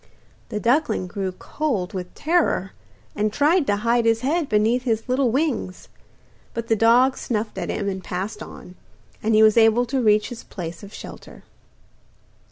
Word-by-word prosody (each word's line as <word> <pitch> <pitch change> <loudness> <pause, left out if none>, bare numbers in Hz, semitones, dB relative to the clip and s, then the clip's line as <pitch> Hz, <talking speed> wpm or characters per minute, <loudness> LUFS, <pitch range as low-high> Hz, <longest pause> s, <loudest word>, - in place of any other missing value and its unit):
The 210 - -3
duckling 235 -4 +1
grew 190 +1 -4
cold 205 -2 -3
with 180 -2 -6
terror, 310 - +1 0.4
and 210 0 0
tried 295 - +2
to 205 - +2
hide 230 +3 +1
his 225 0 +2
head 300 +3 0
beneath 220 +3 +2
his 225 -2 -1
little 255 0 +2
wings; 250 - -2 0.7
but 230 0 -4
the 225 - +4
dog 240 +4 +4
snuffed 215 -3 -3
at 175 - -4
him 205 -2 -2
and 190 -1 -3
passed 195 +4 -4
on, 180 - -10 0.5
and 220 0 +1
he 215 - +6
was 215 +1 +5
able 225 +2 +5
to 260 +2 -1
reach 210 -2 +3
his 240 -2 -8
place 170 -3 -7
of 200 -1 -11
shelter. - - -11
225 Hz, 170 wpm, -23 LUFS, 205-250 Hz, 0.7 s, he